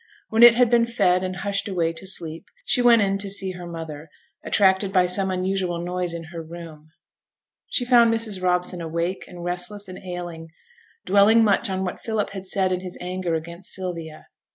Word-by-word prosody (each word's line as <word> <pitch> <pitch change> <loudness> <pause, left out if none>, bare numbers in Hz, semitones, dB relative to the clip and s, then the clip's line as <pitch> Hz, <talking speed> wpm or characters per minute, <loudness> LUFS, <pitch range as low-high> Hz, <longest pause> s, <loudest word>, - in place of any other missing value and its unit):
When 220 +1 +1
it 240 -1 +10
had 245 -1 +3
been 235 -1 +4
fed 185 -6 +2
and 185 0 -3
hushed 200 +2 -2
away 170 -4 -1
to 190 - -5
sleep, 165 -1 -3 0.2
she 255 - +2
went 235 -3 +6
in 195 0 0
to 200 0 -2
see 195 -1 0
her 180 -1 -8
mother, 160 -2 -8 0.3
attracted 190 -1 +2
by 185 -2 +4
some 190 +2 0
unusual 185 -1 -1
noise 175 0 -2
in 165 - -6
her 165 - -5
room. 160 -2 -11 0.8
She 245 - -1
found 240 -2 +5
Mrs. 225 -4 0
Robson 180 0 0
awake, 170 +3 -3
and 175 -1 -10
restless, 180 +4 -3
and 185 - -9
ailing; 175 -3 -6 0.6
dwelling 205 +3 +5
much 200 -2 +2
on 190 0 -2
what 180 - -5
Philip 220 -3 -2
had 195 -1 -7
said 190 -1 +1
in 180 - 0
his 180 -1 -8
anger 180 -1 -3
against 170 +3 -6
Sylvia. 170 -4 -6
185 Hz, 190 wpm, -23 LUFS, 175-200 Hz, 0.8 s, it